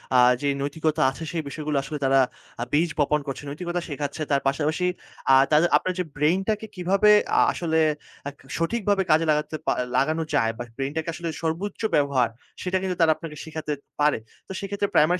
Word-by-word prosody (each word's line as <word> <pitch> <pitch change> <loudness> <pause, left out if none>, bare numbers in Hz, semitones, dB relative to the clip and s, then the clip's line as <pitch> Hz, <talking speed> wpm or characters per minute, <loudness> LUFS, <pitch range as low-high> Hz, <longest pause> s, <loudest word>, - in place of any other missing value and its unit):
আ 125 - +7 0.2
যে 145 - 0
নৈতিকতা 155 +2 -1
আছে, 150 +5 -8
সেই 165 -2 -2
বিষয়গুলো 150 0 -2
আসলে 150 +2 -5
তারা 135 0 +4 0.4
আ - - +1
বীজ 165 +3 +3
বপন 150 +1 +3
করছে, 135 +1 -5
নৈতিকতা 175 +4 -3
শেখাচ্ছে। 145 +1 -4
তার 140 -1 +3
পাশাপাশি 155 +5 0 0.5
আ - - +8 0.2
তাদের 155 +3 +5
আপনার 185 - -2
যে - - +2
ব্রেইনটাকে 190 +8 +1
কিভাবে 195 +3 +3 0.3
আ - - +6
আসলে 160 -2 -1 0.5
আ - - -1 0.3
সঠিকভাবে 200 +2 +1
কাজে 160 +1 +4
লাগাতে 150 +1 -1
পা - - +4 0.3
লাগানো 155 +4 +1
যায় 115 -4 +3
বা 120 - -4
ব্রেইনটাকে 150 +4 -2
আসলে 170 +1 -4
সর্বোচ্চ 170 +7 -2
ব্যবহার, 140 -5 +2 0.3
সেটা 185 +1 0
কিন্তু 185 -1 -2
তারা 160 - +6
আপনাকে 155 -2 -8
শেখাতে 155 -1 -4 0.3
পারে। 150 -3 +4 0.3
তো - - -9
সেক্ষেত্রে 200 +1 -2
প্রাইমারি 175 +4 +4
160 Hz, 180 wpm, -25 LUFS, 145-180 Hz, 0.5 s, আ